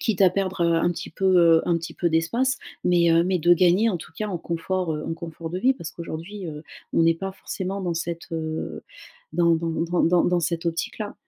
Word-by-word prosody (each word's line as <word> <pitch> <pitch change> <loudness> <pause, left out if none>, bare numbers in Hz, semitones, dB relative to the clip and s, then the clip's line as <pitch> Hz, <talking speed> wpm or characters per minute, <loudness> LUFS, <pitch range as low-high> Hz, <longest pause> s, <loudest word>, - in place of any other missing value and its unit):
Quitte 205 -4 +1
à 185 - +7
perdre, 190 -1 -1
heu, 170 0 +3
un 165 +1 +2
petit 175 - -6
peu, 190 +4 -2
heu, 165 -2 +6
un 175 - +2
petit 165 0 -6
peu 175 - 0
d'espace. 230 +12 +1 0.3
Mais, 175 -1 +4
heu, 165 - +5
mais 185 0 +1
de 175 +2 +5
gagner 185 +5 +4
en 185 - -1
tout - - -12
cas 215 - -2
en 185 -4 -3
confort, 170 +1 -2
heu, 150 - -5
en 165 - -2
confort 165 0 -7
de 180 - -3
vie. 260 +7 +3
Parce 170 -10 -7
qu'aujourd'hui, 170 +4 -7
heu, 150 -1 -7 0.3
on - - +4
n'est 165 0 +4
pas 195 +3 -5
forcément 190 0 -5
dans 175 -2 -1
cette, 170 0 -4
heu, 160 -1 -4 0.5
dans 170 -1 +3
dans 165 +1 -2
dans 170 +2 0
dans 175 +1 +4
dans 175 -1 +2
cette 170 +1 -2
optique-là. 185 +5 -3
170 Hz, 235 wpm, -24 LUFS, 165-185 Hz, 0.5 s, à